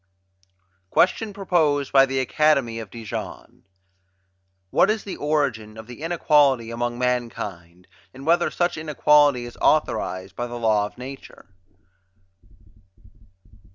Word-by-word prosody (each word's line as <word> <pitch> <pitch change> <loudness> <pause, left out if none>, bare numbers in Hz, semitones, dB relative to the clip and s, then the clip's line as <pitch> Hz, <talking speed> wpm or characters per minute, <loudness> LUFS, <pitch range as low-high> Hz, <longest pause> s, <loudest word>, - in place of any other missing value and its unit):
QUESTION 210 - +2
PROPOSED 160 -8 0
BY 135 -1 +7
THE 135 0 -3
ACADEMY 135 -4 +1
OF 110 -3 -8
DIJON 115 -1 -8 1.1
What - - +4
is 215 -1 0
the 195 - -6
Origin 130 -8 -2
of 110 - -9
the 125 +4 -12
Inequality 145 -8 +2
among 120 0 -3
Mankind; 105 -8 -4 0.3
and 135 +2 -12
whether 170 +2 +3
such 175 -1 -1
Inequality 150 -4 +3
is 120 - -11
authorized 95 - 0
by 120 - -3
the 120 0 -7
Law 110 -3 +1
of - - -18
Nature? 130 -2 -11
130 Hz, 120 wpm, -23 LUFS, 115-150 Hz, 1.1 s, BY